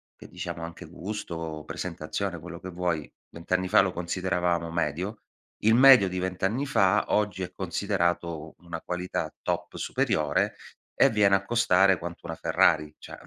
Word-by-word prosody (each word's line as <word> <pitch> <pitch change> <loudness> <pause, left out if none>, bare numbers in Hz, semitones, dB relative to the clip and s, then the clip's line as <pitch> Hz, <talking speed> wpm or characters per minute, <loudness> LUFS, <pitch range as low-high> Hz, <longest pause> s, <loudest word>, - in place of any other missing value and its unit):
che - - -14
diciamo 85 - -6
anche 85 +1 -8
gusto, 85 -4 -6
presentazione, 85 +1 -4
quello 85 +1 -9
che 95 - -7
vuoi, 85 -4 -2 0.2
20 85 +1 -12
anni 90 0 +2
fa 90 - +6
lo 95 -1 0
consideravamo 90 -1 -1
medio. 85 +6 -2 0.4
Il 110 +1 +5
medio 130 -6 +8
di 90 - -4
20 95 0 -3
anni 115 +9 +1
fa 105 -6 +2
oggi 105 -3 0
è - - -5
considerato 90 -2 -1
u 80 0 -11
una 85 -1 -7
qualità 90 +2 -3
top - - -3
superiore 75 -2 0 0.4
e - - +5
viene 105 -2 +4
a 95 - 0
costare 95 -4 +4
quanto 85 0 -8
una 80 - -4
Ferrari. 75 -1 +2
Cioè - - -10
90 Hz, 165 wpm, -27 LUFS, 85-95 Hz, 0.4 s, medio